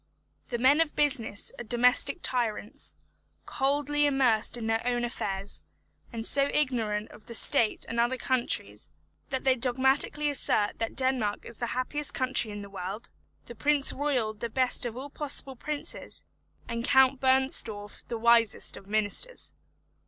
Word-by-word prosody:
The 240 - -2
men 265 +6 +4
of 320 -2 -1
business 255 -8 0
are - - -4
domestic 250 +4 +2
tyrants, 240 +1 -2 0.5
coldly 290 +2 +1
immersed 250 -5 +1
in 230 - -5
their 225 0 0
own 240 0 -1
affairs, 200 -4 -3 0.5
and 225 -2 -6
so 280 +2 +2
ignorant 225 -7 -1
of 210 - -16
the 235 - -5
state 230 -3 +5
of 230 - -3
other 240 +2 +1
countries, 255 -1 -1 0.4
that 265 -1 -3
they 265 -1 +3
dogmatically 265 +4 +1
assert 235 -7 0
that 225 - -3
Denmark 260 -6 0
is 235 - -10
the 240 - -2
happiest 290 +3 -2
country 255 -3 +1
in 205 -1 -7
the - - -9
world; 195 +4 -7 0.3
the 235 - -9
Prince 285 +4 +3
Royal 260 -7 -1
the 225 +2 -6
best 250 +1 +1
of 235 0 -7
all 275 +2 -7
possible 280 -2 -1
princes; 295 +4 -4 0.4
and 235 0 -4
Count 265 +1 +4
Bernstorff 260 -6 +2
the 235 - -4
wisest 230 -1 +3
of 195 - -14
ministers. 215 - -1
245 Hz, 150 wpm, -28 LUFS, 225-270 Hz, 0.5 s, state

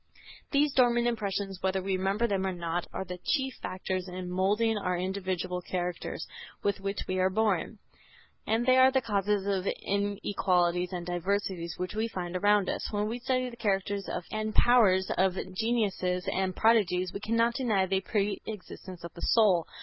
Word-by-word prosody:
These 285 0 +3
dormant 240 -2 +4
impressions, 200 -4 -2
whether 190 0 +1
we 190 0 -1
remember 195 +5 0
them 200 -4 0
or - - 0
not, 175 -1 -3
are 190 - -4
the 180 0 -7
chief 265 -4 0
factors 185 0 -3
in 180 0 -6
moulding 205 +5 +2
our 180 -3 -1
individual 185 -1 -2
characters 180 -1 -4 0.4
with 200 -1 0
which 195 +1 -3
we 185 0 -1
are 185 0 +3
born, 210 -1 0 0.7
and 225 +2 +1
they 255 0 +5
are 260 0 +7
the 265 -1 +1
causes 205 -2 0
of 195 -2 0
the - - -1
inequalities 185 -3 0
and 175 -2 -4
diversities 175 -1 -2
which 185 +2 -4
we 220 +2 0
find 180 -5 -5
around 205 +1 +3
us. - - -3
When 210 0 0
we 235 +3 -3
study 255 0 -1
the - - -10
characters 200 -2 -1 0.2
and 215 0 -3
powers 200 -6 +4
of 190 -1 +3 0.2
geniuses 195 -4 0
and 190 -1 -1
prodigies 185 -5 +3
we - - -4
cannot 230 +2 +1
deny 220 -7 +1
the 190 0 0
pre 200 +1 -1
existence 185 -3 -8
of 170 - -7
the 170 - -11
soul. 195 -7 +4
195 Hz, 175 wpm, -29 LUFS, 185-220 Hz, 0.7 s, are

